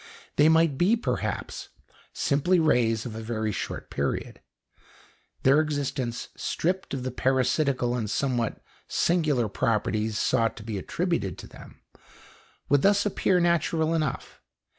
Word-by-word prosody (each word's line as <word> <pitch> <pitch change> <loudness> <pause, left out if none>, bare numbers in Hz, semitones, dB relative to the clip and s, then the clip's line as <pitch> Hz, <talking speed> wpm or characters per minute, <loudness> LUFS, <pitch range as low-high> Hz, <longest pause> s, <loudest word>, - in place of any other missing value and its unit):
They 150 +2 +5
might 160 -4 +3
be, 195 +6 +4
perhaps, 235 - -3 0.4
simply 170 +6 +2
rays 115 -8 +2
of 120 - -5
a 110 - -6
very 110 -1 -2
short 95 - -5
period. - - -3 1.0
Their 135 +3 +5
existence, 140 -5 -3
stripped 185 -3 -2
of 130 - -4
the 130 - -3
parasitical 130 0 +1
and 110 -4 -2
somewhat 120 -1 -1 0.2
singular 155 -9 +1
properties 110 0 0
sought 115 -3 +1
to 110 - -8
be 105 -2 -4
attributed 165 - -2
to - - -10
them, - - -14 0.9
would 145 -1 +3
thus 200 +3 +3
appear 190 -2 +2
natural 165 -1 +1
enough. 155 -5 -3
135 Hz, 130 wpm, -26 LUFS, 115-165 Hz, 1.0 s, They